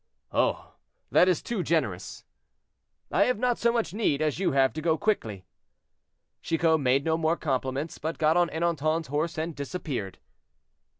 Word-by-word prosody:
"Oh! - - 0 0.4
that 180 - +5
is 180 -4 +1
too 230 -5 -2
generous." 145 - -2 0.9
"I 200 - +4
have 250 -2 +1
not 245 +1 0
so 235 - +3
much 230 -5 -1
need 205 -10 +1
as 155 0 0
you 190 - +1
have 135 -1 +3
to 155 - -5
go 160 0 +2
quickly." 110 - -1 1.0
Chicot 165 -1 +2
made 135 0 +2
no 160 0 +2
more 165 +1 +1
compliments, 135 +1 -2
but 160 +2 -3
got 155 0 +3
on 175 -1 +3
Ernanton's 160 -2 -1
horse 155 +4 -1
and 160 0 -3
disappeared. 140 - -5
160 Hz, 160 wpm, -27 LUFS, 140-175 Hz, 1.0 s, that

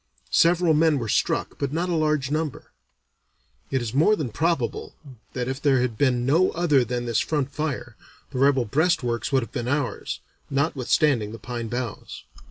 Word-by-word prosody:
Several 170 -1 +4
men 155 -1 +3
were 115 -4 -3
struck, - - 0
but 140 -2 -1
not 170 +4 -1
a 180 - -1
large 155 -4 +1
number. 155 -1 -3 1.0
It 130 -2 0
is 115 -1 -4
more 160 +10 +4
than 140 - -4
probable 160 -2 -1 0.4
that 125 -1 -3
if 130 +1 -4
there 135 -3 +3
had 125 -2 -1
been 125 0 +1
no 165 +8 +4
other 155 -6 +3
than 120 +1 -3
this 115 -2 +1
front 145 -3 -1
fire, 125 -7 -4 0.4
the 130 - -4
rebel 135 -2 +3
breastworks 135 - 0
would 135 -2 +2
have - - -10
been 120 -3 -4
ours, 145 -1 -2 0.3
notwithstanding 135 -5 +1
the - - -6
pine 120 +1 -5
boughs. 120 -1 -5
135 Hz, 175 wpm, -24 LUFS, 120-155 Hz, 1.0 s, Several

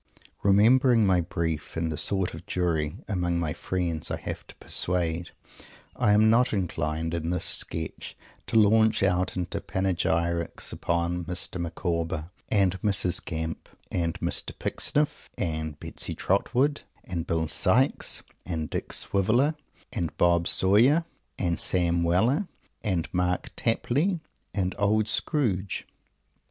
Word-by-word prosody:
Remembering 115 +4 +5
my 95 -2 +3
"brief" 80 -3 -3
and 80 0 -1
the - - -2
sort 95 +1 0
of - - -10
jury, 80 -4 0
among 90 -4 0
my 80 -3 -1
friends, 85 -3 -2
I - - -3
have - - -6
to - - -13
persuade, 85 -1 0 0.7
I 105 - +3
am 110 +1 +5
not 120 +3 +4
inclined 80 -4 -2
in 85 -1 -2
this 90 -1 -1
sketch 80 -1 -2 0.3
to - - -4
launch 110 0 +4
out 95 -1 +1
into 90 -1 -3
panegyrics 85 -2 -1
upon 85 +1 -1
Mr. 90 +1 -2
Micawber 85 -1 -3 0.2
and 95 -3 +2
Mrs. 95 -4 +1
Gamp 80 -1 -4 0.2
and 85 -2 -1
Mr. - - -1
Pecksniff 150 0 -1
and 80 -5 -3
Betsy - - -3
Trotwood 130 +9 +1 0.2
and 85 -3 -4
Bill 80 -1 0
Sikes 110 - +2 0.2
and 80 -3 -4
Dick - - -3
Swiveller 115 +10 +2 0.4
and 85 -3 -3
Bob 85 0 +3
Sawyer 120 - +5 0.3
and 85 -3 -1
Sam 85 -2 +4
Weller 110 - +2 0.4
and 90 -6 0
Mark 90 0 0
Tapley 150 - 0 0.3
and 95 -2 -1
Old 105 +1 +2
Scrooge. 110 - 0
90 Hz, 130 wpm, -27 LUFS, 85-105 Hz, 0.7 s, Remembering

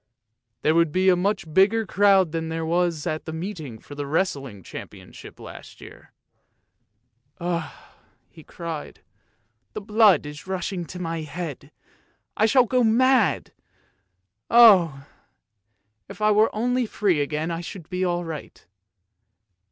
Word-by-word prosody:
There 155 - +3
would 165 -1 +2
be 185 +3 +2
a 180 - +5
much 195 +3 -1
bigger 215 +5 +3
crowd 195 -3 +3
than 165 0 -3
there 165 0 -3
was 170 -2 0
at 155 -2 -3
the - - -5
meeting 160 - -6
for 145 - -13
the 145 0 -5
wrestling 140 - -2
championship - - -11
last - - -12
year. - - -14 0.6
" 120 +5 -48
Ugh! 170 -2 -3 0.3
" - - -39
he 160 - -15
cried, 165 -3 -8 0.3
" 115 0 -47
the - - -4
blood 210 -4 +4
is 150 +4 -9
rushing 185 -1 -3
to 180 - -9
my 165 -2 -3
head; 155 -2 -7 0.6
I 215 - +3
shall 255 +1 +4
go 250 +1 +1
mad. 235 - +2 1.0
Oh! 180 -12 +6 1.0
if 200 0 -10
I 215 0 +3
were 215 +1 +4
only 245 +2 -1
free 190 -8 0
again 155 +3 -2
I 165 0 -4
should 170 -1 -9
be 180 0 -3
all 175 -1 -1
right." 160 -3 -9
175 Hz, 145 wpm, -24 LUFS, 155-200 Hz, 1.0 s, Oh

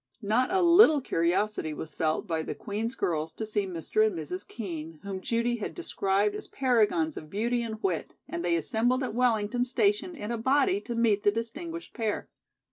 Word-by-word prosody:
Not 225 - +2
a 380 -1 +3
little 340 -3 +7
curiosity 175 - 0
was 160 0 -7
felt 160 +5 0
by 165 -4 -1
the - - -5
Queen's 225 +3 -3
girls 160 -1 -1
to 220 - -4
see 210 -2 -1
Mr. 180 +4 0
and 215 -5 +1
Mrs. 180 +5 -5
Kean, 165 -7 -6
whom 195 -1 -5
Judy 235 +3 0
had 215 - -5
described 205 - 0
as 210 - -6
paragons 265 +5 +1
of 155 - -8
beauty 235 +5 0
and 220 -2 -4
wit, 180 -5 -1
and 170 - -4
they 175 -1 +2
assembled 235 - +1
at 255 - -3
Wellington 240 -1 +1
station 370 - +1
in 220 -6 -5
a 235 - -2
body 290 - +2
to 240 - -5
meet 225 -3 +3
the 205 - +4
distinguished 315 +10 -5
pair. 220 -4 -2
220 Hz, 190 wpm, -28 LUFS, 190-250 Hz, -, little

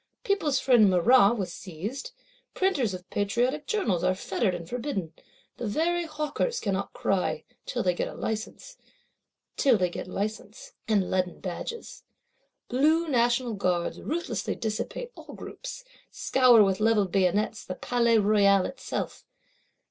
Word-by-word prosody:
People's 315 -10 +1
Friend 240 -6 +5
Marat 200 +5 +5
was 180 -4 -3
seized; 205 - -6 0.5
Printers 275 - +1
of 180 0 -11
Patriotic 245 +8 0
Journals 215 - 0
are 185 - +2
fettered 190 0 -1
and 170 -1 -7
forbidden; 230 - -4 0.4
the 240 - -4
very 340 +9 0
Hawkers 305 - -2
cannot 195 -1 -2
cry, 195 -2 -1 0.2
till - - -2
they 180 - +2
get - - -4
license, 220 - -5 0.8
and 205 -1 -1
leaden 185 -1 -1
badges. 195 - -6 0.7
Blue 310 +6 +2
National 240 -2 +2
Guards 180 -4 -1
ruthlessly 340 +3 -2
dissipate 225 - -4
all - - -11
groups; - - -8 0.3
scour, 250 -4 +5
with 195 -1 +1
levelled 215 -4 +2
bayonets, 200 +3 +1
the 185 - -6
Palais 235 -2 +2
Royal 200 -2 +4
itself. 265 -1 -5
220 Hz, 120 wpm, -27 LUFS, 190-275 Hz, 0.8 s, Friend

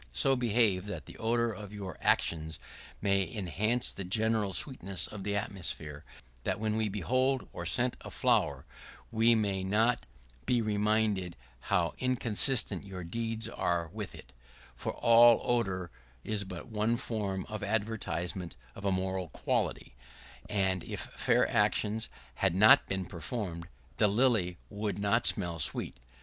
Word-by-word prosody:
So 135 - +3
behave 110 -6 +2
that 105 - -6
the - - -11
odor 115 +1 +1
of 105 -1 -9
your 100 -3 -6
actions 80 -1 +1 0.5
may 100 -1 +2
enhance 110 +6 +1
the 100 - -5
general 110 +2 +1
sweetness 100 - -2
of 105 -2 -7
the 100 0 -1
atmosphere, 80 -7 -4 0.4
that - - -1
when 110 0 0
we 110 -1 +1
behold 130 +7 0
or 85 - -4
scent 120 +7 +1
a - - -8
flower, - - +1 0.5
we 115 +1 +4
may 100 -3 0
not 110 +5 +2 0.4
be 125 - +3
reminded 105 -4 +1 0.3
how 85 -2 +2
inconsistent 120 -4 +1
your 95 -2 -7
deeds 115 +5 -3
are 85 -7 -1
with - - -6
it; 65 - -13 0.4
for - - -4
all 115 0 +7
odor 95 -7 0 0.3
is 105 -2 -1
but 90 -2 -7
one 110 +1 0
form 100 -5 -3
of 110 -1 -5
advertisement 100 -4 -2 0.2
of 100 - -11
a 100 - +2
moral 95 -1 -1
quality, 65 - -2 0.6
and 95 -3 +1
if - - -5
fair - - +3
actions 110 +2 +1 0.3
had 95 -3 +2
not 105 +3 +7
been 95 -1 -2
performed, 85 0 -5 0.3
the 105 - +5
lily 105 -5 +2
would 105 0 -3
not 105 +4 +2
smell 85 -5 +1
sweet. 70 - 0
105 Hz, 145 wpm, -31 LUFS, 95-115 Hz, 0.6 s, all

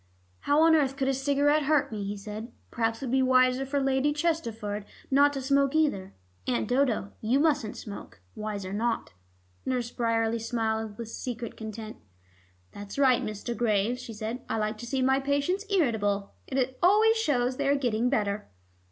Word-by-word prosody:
"How 290 +2 +2
on 325 0 +6
earth 270 -3 +1
could 265 - 0
a - - +2
cigarette 285 +3 +2
hurt 300 -3 +2
me?" 210 -2 -4
he 200 +1 -4
said. 215 +3 -7 0.2
"Perhaps 225 +2 -1
it - - -1
would 245 - -3
be 265 0 +3
wiser 255 0 +3
for 285 +1 0
Lady 270 +1 +2
Chesterford 230 -11 -2 0.3
not 285 +2 +5
to 275 - -3
smoke 275 +1 +2
either. 240 -12 +1 0.3
Aunt 120 -3 0
Dodo, 250 -6 +1
you 240 +5 +2
mustn't 290 -8 +1
smoke. 200 - -9
Wiser 205 -3 -5
not." 225 - -1 0.5
Nurse 245 -2 -2
Bryerley 230 -1 0
smiled 220 -2 -2
with 230 -1 -6
secret 240 -1 -5
content. 220 0 -7 0.7
"That's 205 +3 -9
right, 260 -3 +4
Mr. 215 +3 -4
Graves," 230 +1 +1
she 230 - -8
said. 220 +3 -4
"I 225 - 0
like 215 0 -2
to 240 - -7
see 260 +1 0
my 265 +1 +3
patients 285 +9 0
irritable. 210 - +1
It 260 -1 -1
always 430 +5 +5
shows 255 - +1
they 280 - 0
are 280 - +4
getting 245 -3 +1
better." 210 -5 -1
245 Hz, 175 wpm, -28 LUFS, 215-275 Hz, 0.7 s, on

